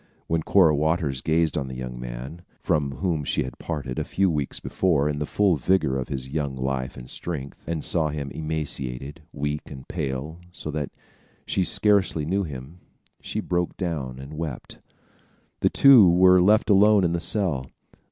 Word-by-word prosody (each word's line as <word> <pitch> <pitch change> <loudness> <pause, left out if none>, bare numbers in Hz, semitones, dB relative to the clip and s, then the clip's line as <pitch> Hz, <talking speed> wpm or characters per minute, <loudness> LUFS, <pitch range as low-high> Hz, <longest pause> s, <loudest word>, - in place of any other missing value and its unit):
When 80 0 0
Cora 80 -3 +4
Waters 75 -3 0
gazed 80 0 +1
on 70 -3 -2
the 65 - -7
young 65 -1 -6
man, 60 +7 -7 0.2
from 70 -3 0
whom 85 -2 -1
she - - 0
had 65 - -8
parted 70 -5 -4
a - - 0
few 95 -2 +1
weeks 75 -3 -2
before 80 -6 +1
in 75 -1 -2
the 75 - -2
full 100 -5 +2
vigor 70 -1 +1
of 65 - -4
his 65 -1 -4
young 70 -1 -3
life 65 0 -3
and 60 0 -9
strength, 70 -4 -6
and 80 -2 -2
saw 80 -3 +1
him 70 -2 -5
emaciated, 75 -2 -4
weak 75 +1 -4
and 65 -3 -10
pale, 70 +5 -4
so 80 -3 -6
that 75 -2 -3 0.6
she 95 - 0
scarcely 95 -6 +2
knew 95 +5 0
him, 75 0 -7 0.4
she - - -3
broke 90 0 -2
down 75 -9 -3
and 70 +3 -9
wept. 75 -6 -6 0.8
The - - +3
two 130 -9 +7
were 90 +1 +6
left 105 +4 +4
alone 105 0 +6
in 85 -1 +1
the 85 - 0
cell. 85 -10 0
75 Hz, 175 wpm, -25 LUFS, 70-85 Hz, 0.8 s, two